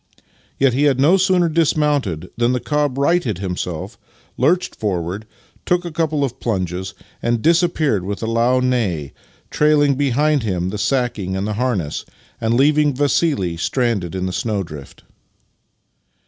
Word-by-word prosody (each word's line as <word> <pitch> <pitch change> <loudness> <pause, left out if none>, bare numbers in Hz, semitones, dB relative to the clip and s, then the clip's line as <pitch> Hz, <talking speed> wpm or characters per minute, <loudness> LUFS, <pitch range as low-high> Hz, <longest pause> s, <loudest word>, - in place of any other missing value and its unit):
Yet 135 -2 +3
he 140 +4 +2
had 135 -3 +2
no 155 +7 +5
sooner 185 -2 +3
dismounted 145 - 0
than 120 +1 +1
the 125 - 0
cob 145 -1 -1
righted 140 - +1
himself, 90 -3 -5 0.4
lurched 175 +8 +1
forward, 95 +1 -3 0.4
took 180 0 0
a 170 - -4
couple 155 -2 0
of 135 -1 -3
plunges, 95 -4 -3 0.3
and 120 0 0
disappeared 160 - +2
with 100 +4 -4
a - - 0
loud 120 +3 +2
neigh, 100 - -1 0.4
trailing 150 -1 +3
behind 145 +2 +1
him 90 -5 -2
the 105 +2 -5
sacking 115 -8 -1
and 95 +2 -2
harness, 105 - -1 0.4
and 115 +1 +1
leaving 145 +1 +3
Vassili 140 - +1
stranded 100 -3 -1
in 95 0 -2
the 95 - -3
snowdrift. 95 - -4
125 Hz, 140 wpm, -19 LUFS, 95-150 Hz, 0.4 s, no